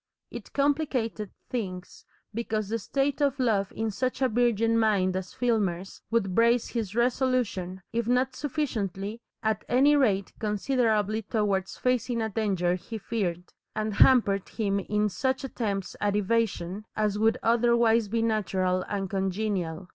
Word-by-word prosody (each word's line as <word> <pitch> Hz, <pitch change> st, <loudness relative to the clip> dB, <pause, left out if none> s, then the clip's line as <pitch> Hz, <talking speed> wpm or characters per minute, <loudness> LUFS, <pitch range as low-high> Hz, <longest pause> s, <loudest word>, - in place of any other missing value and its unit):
It -, -, -8 dB
complicated 275 Hz, -7 st, 0 dB, 0.2 s
things, 185 Hz, -7 st, -5 dB, 0.3 s
because 215 Hz, -2 st, -2 dB
the 230 Hz, +1 st, -1 dB
state 275 Hz, +6 st, -1 dB
of 280 Hz, -1 st, +1 dB
love 210 Hz, -6 st, +1 dB
in 225 Hz, 0 st, -2 dB
such 255 Hz, +5 st, -2 dB
a -, -, +5 dB
virgin 230 Hz, -1 st, +2 dB
mind 195 Hz, -4 st, +2 dB
as 185 Hz, -1 st, -5 dB
Filmer's 195 Hz, -7 st, -1 dB
would 210 Hz, -5 st, +1 dB
brace 235 Hz, +3 st, +3 dB
his 220 Hz, -4 st, -3 dB
resolution, 240 Hz, -7 st, 0 dB
if 230 Hz, -1 st, -1 dB
not 255 Hz, +1 st, +1 dB
sufficiently, 230 Hz, -, -3 dB, 0.2 s
at 220 Hz, -1 st, 0 dB
any 275 Hz, +5 st, +5 dB
rate 205 Hz, -9 st, +2 dB
considerably 215 Hz, -1 st, +1 dB
towards 200 Hz, -3 st, -1 dB
facing 250 Hz, -1 st, 0 dB
a 220 Hz, -1 st, -1 dB
danger 190 Hz, -5 st, 0 dB
he 185 Hz, +5 st, -5 dB
feared, 185 Hz, -6 st, -3 dB, 0.2 s
and 215 Hz, 0 st, -1 dB
hampered 200 Hz, -5 st, +4 dB
him 200 Hz, -3 st, -1 dB
in 210 Hz, +2 st, 0 dB
such 260 Hz, +7 st, -1 dB
attempts 205 Hz, -8 st, -3 dB
at 205 Hz, -1 st, +1 dB
evasion 210 Hz, -2 st, 0 dB
as 210 Hz, -1 st, 0 dB
would 220 Hz, +1 st, +3 dB
otherwise 235 Hz, -1 st, +3 dB
be 225 Hz, +2 st, 0 dB
natural 190 Hz, -4 st, 0 dB
and 195 Hz, -2 st, -2 dB
congenial. 190 Hz, -3 st, -2 dB
220 Hz, 140 wpm, -27 LUFS, 195-240 Hz, 0.3 s, a